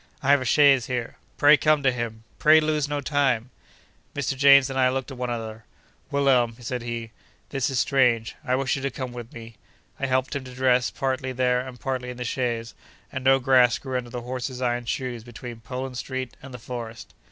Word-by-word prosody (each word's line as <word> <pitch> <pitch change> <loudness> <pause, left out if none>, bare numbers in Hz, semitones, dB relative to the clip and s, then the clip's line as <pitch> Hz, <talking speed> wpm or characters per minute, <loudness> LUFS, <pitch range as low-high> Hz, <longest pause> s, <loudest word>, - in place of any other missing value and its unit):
I 135 - +4
have 140 -1 +5
a - - -3
chaise 135 -1 +5
here. 125 -2 -4 0.2
Pray 150 +1 +7
come 155 -1 +2
to 135 - +4
him. 115 -2 -5 0.2
Pray 155 +1 +7
lose 155 -2 0
no 145 -1 -2
time.' 130 -4 0 0.6
Mr. 140 -1 -1
James 140 0 +7
and 135 -1 -3
I 130 -1 +4
looked 135 +1 -3
at 130 - -8
one 125 0 -3
another. 110 -2 -5 0.5
'Wilhelm,' 130 -5 +2
said 125 0 -4
he, 115 -1 -5 0.4
'this 135 -1 -1
is 130 -2 0
strange. 125 -5 +2
I 130 -3 +1
wish 130 -1 0
you 135 - -4
to 140 - -1
come 130 -1 -6
with 120 -1 -8
me!' 115 -1 -11 0.4
I 140 - -1
helped 130 +1 0
him 140 - -3
to 130 -1 -10
dress, 125 -1 +2
partly 130 -1 -2
there 125 0 +2
and 125 -1 -7
partly 130 -1 -3
in 125 - -7
the 125 - -4
chaise; 120 -2 -2 0.4
and 130 -1 -5
no 135 0 +5
grass 125 -2 +4
grew 130 -2 -6
under 125 -1 -3
the 120 +1 -5
horses' 125 +1 -5
iron 120 -1 -1
shoes 120 -1 -3
between 120 0 -9
Poland 125 +2 -5
Street 130 -2 -5
and 135 - -11
the 125 - -7
Forest. 115 -1 -8
130 Hz, 210 wpm, -25 LUFS, 120-135 Hz, 0.6 s, Pray